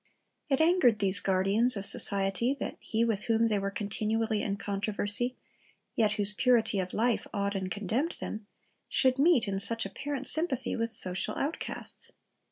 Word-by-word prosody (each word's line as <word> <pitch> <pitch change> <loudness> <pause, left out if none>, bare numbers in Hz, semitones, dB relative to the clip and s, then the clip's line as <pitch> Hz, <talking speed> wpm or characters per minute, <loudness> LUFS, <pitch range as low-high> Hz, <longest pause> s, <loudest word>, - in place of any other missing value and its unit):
It 270 - +1
angered 320 - +4
these 195 -2 +3
guardians 195 +6 +3
of 200 - -4
society 200 +7 +2
that - - -4
He 225 +1 -1
with 220 -3 -2
whom 230 0 +2
they 210 -2 +1
were 195 0 -2
continually 215 +1 -2
in 200 -1 -2
controversy, 205 +4 -2 0.6
yet 215 -2 +2
whose 210 -1 +2
purity 230 -3 +2
of 185 -1 -3
life 235 +1 0
awed 200 0 -1
and 190 -2 -3
condemned 215 - -2
them, 215 -1 -7 0.4
should 260 -1 +2
meet, 295 -7 +4
in 195 -1 -2
such 225 +2 +3
apparent 275 +7 -5
sympathy, 315 -6 +1
with 230 0 -2
social 185 -4 -1
outcasts. 300 +4 -4
215 Hz, 160 wpm, -29 LUFS, 200-245 Hz, 0.6 s, angered